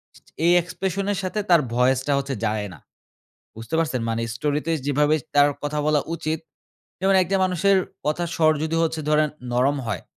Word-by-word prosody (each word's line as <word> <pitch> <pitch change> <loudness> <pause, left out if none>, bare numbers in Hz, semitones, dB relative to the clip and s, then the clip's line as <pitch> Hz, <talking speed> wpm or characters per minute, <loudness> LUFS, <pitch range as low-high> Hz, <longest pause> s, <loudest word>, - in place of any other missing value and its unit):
ছা - - -18
ছা - - -22
এই 175 - +5
এক্সপ্রেশনের 190 +3 -3
সাথে 185 +3 -2
তার 170 -3 +6
ভয়েসটা 130 +3 +2
হচ্ছে 135 -1 -3
যায় 105 -1 -1
না। - - -14 0.8
বুঝতে 115 +8 -7
পারছেন? 150 -7 0
মানে 115 +1 -1
স্টোরিতে 150 +5 -1 0.2
যেভাবে 150 +2 +2 0.2
তার 145 0 +6
কথা 150 +1 -2
বলা 150 -1 +3
উচিত 160 -1 -2 0.6
যেমন 195 +1 +3
একটা 195 +2 0
মানুষের 190 +2 +2 0.3
কথার 165 +3 -1
স্বর 155 -1 +4
যদি 165 +1 -1
হচ্ছে 160 -1 -1
ধরেন 150 0 +3 0.2
নরম 135 +4 +2
হয়। - - -3
155 Hz, 170 wpm, -23 LUFS, 140-175 Hz, 0.8 s, তার